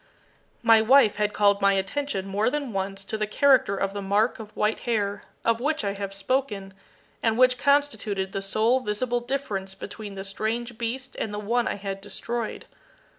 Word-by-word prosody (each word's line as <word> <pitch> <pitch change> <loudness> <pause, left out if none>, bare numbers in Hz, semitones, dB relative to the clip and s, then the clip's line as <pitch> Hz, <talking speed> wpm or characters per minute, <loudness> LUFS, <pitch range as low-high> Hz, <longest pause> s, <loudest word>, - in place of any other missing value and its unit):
My 225 -1 +7
wife 235 -2 +5
had 210 0 +1
called 205 -1 +3
my 200 0 +5
attention 195 +2 -2
more 200 +3 +1
than 280 -4 -3
once 195 0 -3
to 220 +2 -4
the 215 - 0
character 260 -3 +4
of 195 0 -1
the 200 - -4
mark 205 +5 +1
of 215 -2 -8
white 210 +1 +1
hair, 205 -4 -1 0.2
of 230 0 +2
which 300 +3 0
I 200 -1 -1
have 200 -1 -5
spoken, 200 -2 -2 0.5
and 225 -1 +1
which 250 0 +5
constituted 280 -9 +1
the 195 - -3
sole 220 +6 +2
visible 240 +1 -1
difference 215 -7 -3
between 205 +1 -8
the 195 - -5
strange 225 +4 -3
beast 255 +3 -4
and 215 - -2
the 210 - -4
one 230 +3 0
I - - -1
had 195 -1 -5
destroyed. 230 +3 -4
215 Hz, 180 wpm, -26 LUFS, 200-245 Hz, 0.5 s, My